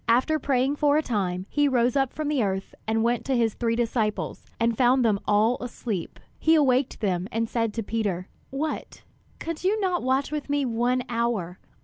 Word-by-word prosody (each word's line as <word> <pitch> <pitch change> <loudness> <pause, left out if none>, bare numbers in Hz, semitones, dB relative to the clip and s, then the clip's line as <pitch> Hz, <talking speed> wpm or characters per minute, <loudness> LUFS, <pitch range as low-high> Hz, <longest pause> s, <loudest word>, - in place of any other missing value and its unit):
After 260 +7 +3
praying 270 +1 +1
for 295 0 +3
a 310 - +1
time, 185 -7 -1
he 290 +4 +2
rose 245 -2 +2
up 270 -2 +2
from 310 -1 -4
the 295 -3 +1
earth 195 -2 -2
and 220 0 +1
went 235 0 +1
to 265 -2 +1
his 225 -2 +2
three 230 -1 0
disciples, 225 -2 -1
and 230 0 +2
found 250 +1 +4
them 210 -3 +2
all 215 +4 +3
asleep. 225 -7 -4 0.2
He 320 +1 +4
awaked 260 -4 +2
them, 185 -3 0
and 230 +1 0
said 230 -1 0
to 225 - -2
Peter: 200 -4 -2 0.2
"What, 300 +3 -4 0.3
could 330 0 -5
you 405 +4 +2
not 370 -3 0
watch 265 +2 0
with 300 -1 -4
me 285 -1 +1
one 245 +1 +1
hour? 230 -7 -1
240 Hz, 195 wpm, -26 LUFS, 220-275 Hz, 0.3 s, found